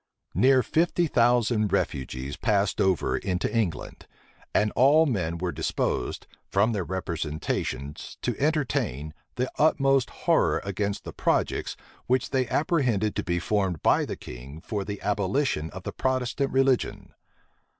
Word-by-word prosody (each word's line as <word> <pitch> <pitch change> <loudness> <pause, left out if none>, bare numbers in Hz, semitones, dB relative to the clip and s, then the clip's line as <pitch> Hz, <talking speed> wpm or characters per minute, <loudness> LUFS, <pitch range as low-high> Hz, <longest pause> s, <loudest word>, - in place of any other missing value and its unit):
Near 130 0 +4
fifty 170 +7 +1
thousand 120 - +2
refugees 65 +2 -2
passed 105 -3 +1
over 95 -4 +2
into 90 +4 -2
England; 100 -9 -2 0.4
and 105 0 +2
all 145 +5 +5
men 90 - -1
were 90 +1 -2
disposed, - - -2 0.2
from 100 +4 +3
their 100 -5 -1
representations, 80 -5 -4
to - - 0
entertain, 130 - 0 0.2
the 125 +1 -1
utmost 135 -4 +3 0.2
horror - - +3
against 100 +1 -2
the - - -8
projects - - 0 0.3
which 130 0 +1
they 130 -2 +1
apprehended 125 - +1
to - - -1
be 85 -1 -1
formed 95 -2 -1
by - - +4
the - - -4
king 65 +5 -9
for 105 +1 -3
the 100 0 -5
abolition 100 - 0
of 95 +1 -9
the - - -5
Protestant 130 +1 0
religion. 135 -1 +1
105 Hz, 135 wpm, -26 LUFS, 90-130 Hz, 0.4 s, all